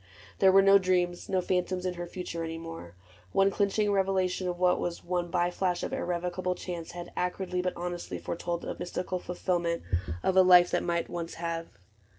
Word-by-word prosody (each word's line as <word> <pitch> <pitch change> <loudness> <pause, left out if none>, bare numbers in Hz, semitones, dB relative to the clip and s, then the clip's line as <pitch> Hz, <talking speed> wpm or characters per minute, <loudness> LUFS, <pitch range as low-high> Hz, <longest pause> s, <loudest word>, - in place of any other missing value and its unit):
There 190 -1 +6
were 195 +1 +7
no 195 0 +7
dreams, 180 -2 0
No 185 -1 +2
phantoms 180 0 -1
in 180 - 0
her 175 0 -6
future 170 -2 -5
any 165 0 -4
more: 165 - -8 0.4
One 195 0 +4
clinching 205 +1 +1
revelation 190 -2 +1
of 175 -1 -2
what 180 0 +3
was. 175 -1 -3
One 175 0 -1
by 175 0 +1
flash 180 -1 -1
of - - -3
irrevocable 180 +1 -2
chance, 175 -3 -6
Had 175 0 -8
acridly 180 0 -1
but 180 0 -1
honestly 175 0 -4
foretold 170 0 -3
The - - -4
mystical 180 +1 -3
fulfillment 175 -1 -1 0.4
of 190 - +1
a 190 - +8
life 180 -1 +7
That - - +1
might 170 -1 0
have - - -21
once 170 -1 -4
180 Hz, 185 wpm, -29 LUFS, 175-185 Hz, 0.4 s, a